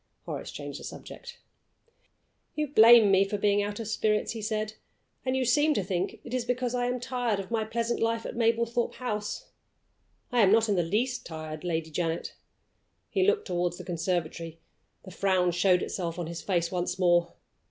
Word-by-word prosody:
Horace - - -5
changed - - -7
the - - -11
subject. 485 0 -9 1.2
"You 305 - 0
blame 225 -4 +8
me 195 0 +5
for 200 +1 -2
being 205 0 +2
out 205 +1 -3
of 225 - -4
spirits," 215 -1 0
he 225 - -5
said; 215 0 -2 0.5
"and 260 0 0
you 260 - +1
seem 295 +5 +3
to 200 - 0
think 180 -1 -2
it - - -9
is 255 -1 0
because 245 0 -1
I 245 0 0
am 250 0 -1
tired 245 -4 -1
of 195 +2 -7
my 225 -2 0
pleasant 235 +1 -1
life 230 0 0
at - - -5
Mablethorpe 235 +1 +1
House. 210 -4 -4 0.8
I 245 -1 +3
am 195 -2 +5
not 225 +1 +4
in 205 - +2
the 180 - +3
least 225 +9 -1
tired, 155 -1 -7
Lady 160 -2 -2
Janet." 165 +1 -2 0.8
He 385 -1 +2
looked 425 0 +2
toward 175 -2 -1
the 180 - -9
conservatory: 165 -2 -3 0.4
the 190 - -11
frown 185 -1 +2
showed 180 +1 +3
itself 170 -3 -3
on 175 - -3
his 170 +1 -6
face 170 -3 0
once 180 0 -2
more. 175 -2 +3
205 Hz, 185 wpm, -28 LUFS, 175-235 Hz, 1.2 s, blame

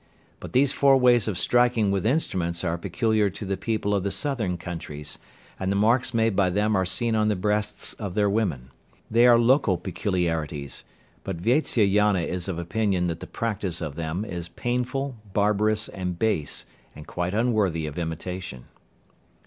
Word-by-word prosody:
But - - -9
these 135 +2 +3
four 135 -1 +5
ways 120 -4 +4
of 100 -5 -1
striking 120 -4 +3
with 100 +1 0
instruments 90 - 0
are 85 -2 0
peculiar 110 +3 +1
to 100 - -7
the 95 0 -1
people 110 -1 -1
of 100 - +1
the 100 - -1
southern 110 -8 -2
countries, 80 -4 -6 0.4
and 95 0 -1
the - - +1
marks 115 +5 +3
caused 115 -4 +1
by 95 -2 +3
them 105 +3 +1
are 95 -1 +1
seen 115 +4 0
on 110 -1 +2
the 105 - +2
breasts 105 +2 -1
of 100 -5 -6
their 105 -1 +3
women. 90 - -1 0.4
They 120 +2 +6
are 120 -1 +7
local 120 -5 +3
peculiarities, 80 -7 -3 0.4
but 95 -3 -4
Vatsyayana 105 - +2
is 90 +1 -3
of 95 -4 -3
opinion 95 +1 0
that 80 - -4
the - - -8
practice 100 -6 -2
of 75 -4 -4
them 85 +6 -3
is 85 -4 -5
painful, 125 +3 -2 0.2
barbarous, 105 +1 +1
and 90 -2 -4
base, 95 -9 -1 0.3
and 75 - -10
quite 90 +3 -3
unworthy 105 -9 +1
of 75 +2 -5
imitation. 85 -4 -5
100 Hz, 170 wpm, -25 LUFS, 90-115 Hz, 0.4 s, are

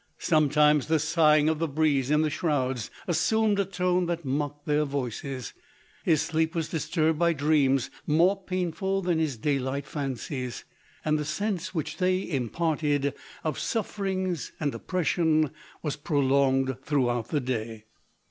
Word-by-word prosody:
Sometimes 150 -2 +3
the 160 0 +3
sighing 155 -1 +4
of 160 -1 +1
the 165 - 0
breeze 145 -3 +1
in 150 +1 +3
the 155 - 0
shrouds 135 -7 -1 0.2
assumed 205 +5 +2
a 200 - +2
tone 180 -1 0
that 170 -2 -3
mocked 145 +2 -2
their 150 0 +2
voices; 135 -2 -4 0.5
his 160 -4 +3
sleep 160 +1 0
was 165 -2 -1
disturbed 160 -1 0
by 170 -1 +3
dreams 140 -3 +2 0.2
more 175 +6 +3
painful 185 +2 -1
than 175 -2 +1
his 150 -6 -1
day 140 +5 0
light 135 +2 -3
fancies; 135 -2 -4 0.4
and 155 0 +2
the - - -1
sense 185 +2 -3
which 155 - -3
they 185 0 +1
impart 155 +3 -1
ed 145 -2 +1 0.3
of 155 -3 -2
suffering 195 -4 -1 0.2
and 145 -3 -1
oppression, 160 -3 +1 0.3
was 150 -3 -2
prolonged 135 -3 +2
throughout 120 -5 0
the 150 - 0
day. 115 -4 -4
150 Hz, 150 wpm, -27 LUFS, 140-170 Hz, 0.5 s, sighing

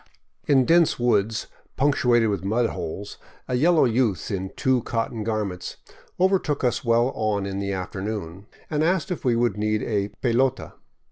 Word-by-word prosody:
In 135 -3 +4
dense 170 +1 +4
woods 110 -3 +1 0.3
punctuated 125 -5 +3
with 100 -2 -2
mud 115 +4 +1
holes, 95 +3 -6 0.3
a - - -3
yellow 155 +5 +4
youth 115 - 0
in 95 -1 -3
two 130 -2 +1
cotton 115 -1 -3
garments 105 -5 -3 0.4
overtook 185 -7 +1
us 120 -2 0
well 120 +1 +3
on 105 -2 -1
in 100 0 -4
the 100 0 -2
afternoon, 95 0 -5 0.2
and 150 0 0
asked 180 +2 0
if 180 - -4
we 125 -2 +2
would 115 -3 +1
need 105 0 0
a 100 -3 -1 0.2
"pelota." 125 +1 +1
115 Hz, 155 wpm, -24 LUFS, 100-130 Hz, 0.4 s, In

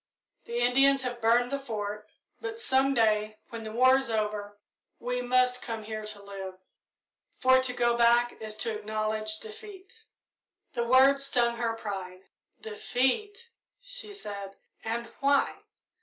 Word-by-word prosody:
The 235 - -4
Indians 270 +2 +4
have 245 -1 -4
burned 240 +2 +3
the 280 - -1
Fort, 210 -4 -5 0.3
but 455 -1 -6
some 275 -9 +2
day, 215 -2 +2
when 230 -1 -7
the 220 -1 -6
war 255 +3 +5
is 265 - -3
over, 210 -2 -2 0.4
we 250 +1 -2
must 250 0 +2
come 225 -2 -5
here 215 0 -5
to 210 -1 -5
live, 195 -2 -7 0.8
for 260 0 +5
to 260 -1 -1
go 240 -1 +1
back 240 +1 +4
is 215 -1 -5
to 225 -2 -1
acknowledge 215 0 -2
defeat." 430 - -11 0.7
The 235 -1 -1
word 265 +2 +6
stung 240 -4 +2
her 230 -1 0
pride. 190 -4 -6 0.4
"Defeat!" 405 - -1 0.3
she - - -5
said; 200 - -7 0.3
"and 230 +1 -2
why? 280 0 +2
235 Hz, 140 wpm, -28 LUFS, 215-265 Hz, 0.8 s, word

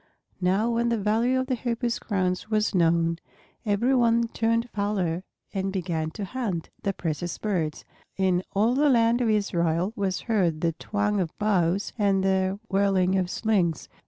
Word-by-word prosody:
Now 195 +6 +2
when 235 0 +1
the 235 - +1
value 225 +5 +1
of 260 - -1
the 260 - -1
Hoopoes' 235 0 -2
crowns 185 -2 -1
was 215 -1 +1
known, 165 -1 +2 0.5
every 220 +6 +2
one 235 -2 +3
turned 230 +1 0
fowler 190 -4 -1 0.3
and 195 -1 -1
began 170 -4 -2
to 205 - -3
hunt 195 -7 -4
the 200 - 0
precious 175 -1 -3
birds. 170 -8 -2 0.3
In 185 -2 +2
all 220 +5 +3
the 290 +3 +3
land 235 -1 +3
of 235 - +2
Israel 180 -3 +1
was 195 -2 -1
heard 180 -9 0
the 170 - +2
twang 205 +3 -1
of 170 -4 -3
bows 195 -2 +1
and 195 -2 +2
the 190 0 +1
whirling 195 -2 +2
of 185 -2 0
slings. 190 -7 0
200 Hz, 160 wpm, -26 LUFS, 180-230 Hz, 0.5 s, one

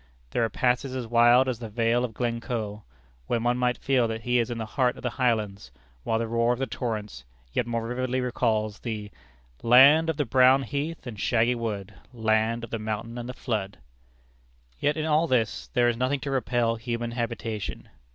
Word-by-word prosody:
There 120 - +1
are 115 - +1
passes 125 +4 0
as 125 -2 -3
wild 120 +3 +5
as 125 -3 -2
the 115 -2 -6
Vale 115 +2 +1
of 115 -3 -4
Glencoe, 115 -3 -3 0.5
where 120 - +1
one 120 +1 +1
might 125 -1 +1
feel 130 -3 +2
that 110 0 -4
he 125 +1 +2
is 115 - 0
in 120 - -4
the 110 - -3
heart 125 +2 0
of - - -11
the 125 - -1
Highlands, 110 - -1 0.3
while 110 - 0
the 115 - -1
roar 115 +1 +1
of - - -4
the 135 - -1
torrents 105 - -4 0.3
yet 120 - 0
more 115 -1 -2
vividly 130 +1 -1
recalls 110 -4 0
the 105 -3 -5 0.5
Land 140 +7 +7
of 160 - -1
the 145 - 0
brown 130 +2 +5
heath 145 +4 -4
and 115 -5 -7
shaggy 120 +2 +2
wood, 105 -4 -4 0.2
Land 110 0 +1
of 115 - -8
the 115 - -2
mountain 110 +2 -4
and 120 +1 -6
the - - -4
flood. 105 -7 -3 1.0
Yet 150 +2 +1
in 155 - -1
all 160 +1 +2
this 120 -6 0
there 120 -1 +4
is 120 -1 +1
nothing 130 +3 0
to 140 - -3
repel 120 -3 0
human 120 0 -3
habitation. 115 -3 -4
120 Hz, 200 wpm, -26 LUFS, 110-125 Hz, 1.0 s, Land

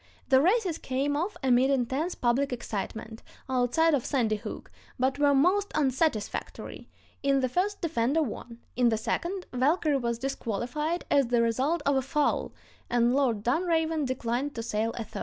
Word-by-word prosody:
The 265 -1 +6
races 370 -1 +2
came 275 +3 -1
off 350 +8 -2
amid 260 0 +4
intense 275 +6 0
public 255 +3 +1
excitement, 220 -1 -5 0.3
outside 260 +6 +2
of 270 -5 +1
Sandy 230 -6 0
Hook, - - -8 0.3
but 260 +2 0
were 285 -1 +4
most 375 +8 +3
unsatisfactory; 265 -5 -1 0.3
"in 275 -1 +2
the 255 - +1
first, 380 +9 -1
Defender 305 -1 +1
won; 235 -2 -7 0.2
in 245 -1 +4
the 220 - +1
second, 355 - -2
Valkyrie 290 +3 +2
was 235 -2 -1
disqualified 270 - -3
as 280 -3 +4
the 235 -1 +2
result 270 +8 0
of 280 -1 +3
a - - +2
foul, 290 +3 0 0.4
and 240 0 +3
Lord 250 -7 +1
Dunraven 320 +3 +1
declined 255 +2 -2
to 230 - -4
sail 225 0 -1
a 235 - -2
third." - - -8
265 Hz, 160 wpm, -28 LUFS, 240-310 Hz, 0.4 s, The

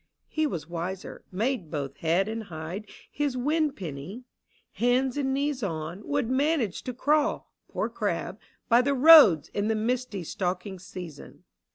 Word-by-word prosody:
" - - -52
He 310 -1 0
was 160 - -5
wiser, 175 +3 -5
made 210 - -1
both 140 -3 -4
head 170 +4 +1
and 220 0 -4
hide 175 +4 -7 0.2
His 285 -3 -1
win 300 +4 +1
penny: 180 - -7 0.5
hands 250 +2 +1
and 275 -2 0
knees 280 0 -1
on, 165 -1 -4
Would 285 -5 0
manage 260 - +1
to 255 - -3
crawl 295 +3 +1
— - - -54
poor - - -1
crab - - -3
— - - -41
by 235 +1 +5
the 280 +2 +1
roads 265 - +8
In 205 +1 -2
the 220 - +1
misty 225 -3 -2
stalking 180 +2 -3
season. 175 -5 -10
220 Hz, 165 wpm, -27 LUFS, 175-270 Hz, 0.5 s, roads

